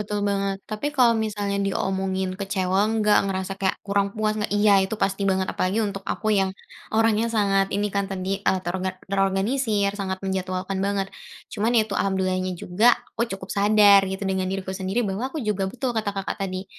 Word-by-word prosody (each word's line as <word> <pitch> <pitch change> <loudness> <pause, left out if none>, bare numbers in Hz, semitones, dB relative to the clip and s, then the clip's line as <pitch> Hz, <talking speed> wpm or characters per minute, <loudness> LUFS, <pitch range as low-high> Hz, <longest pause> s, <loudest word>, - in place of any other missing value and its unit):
betul 210 0 -3
banget. 195 -1 0
Tapi 215 +7 -3
kalau 240 -2 +6
misalnya 205 -2 -2
diomongin 190 -1 -1
kecewa 190 -1 0
enggak, 210 -2 +3
ngerasa 190 0 -2
kayak 190 -1 +1
kurang 200 0 +1
puas 215 0 +1
enggak? 210 - -2
Iya, 205 0 +5
itu 205 - -3
pasti 195 0 0
banget. 190 0 +1
Apalagi 190 +4 0
untuk 200 -1 -4
aku 215 - -6
yang 195 0 +2 0.5
orangnya 225 0 +3
sangat 195 -2 +3
ini 205 0 +1
kan, 200 0 +1
terdi 190 -1 -4 0.2
eee, 190 - +2 0.5
terorganisir, 200 +2 +1
sangat 190 -1 -2
menjadwalkan 190 0 -2
banget. 200 -1 0 0.5
Cuman 220 +2 0
itu 215 -2 +2
alhamdulilah 190 -1 0
nya - - -2
juga, 200 +7 +1 0.3
aku - - -1
cukup 190 0 -11
sadar 205 0 +6
gitu 190 +1 -5
dengan 190 -1 -1
diriku 190 0 -3
sendiri 195 +6 0
bahwa 210 +7 -2
aku 315 - -6
juga 195 -2 0
betul, 250 +2 -3
kata 220 -2 -1
Kakak 195 - -3
tadi 185 +1 -5
195 Hz, 180 wpm, -24 LUFS, 190-210 Hz, 0.5 s, kalau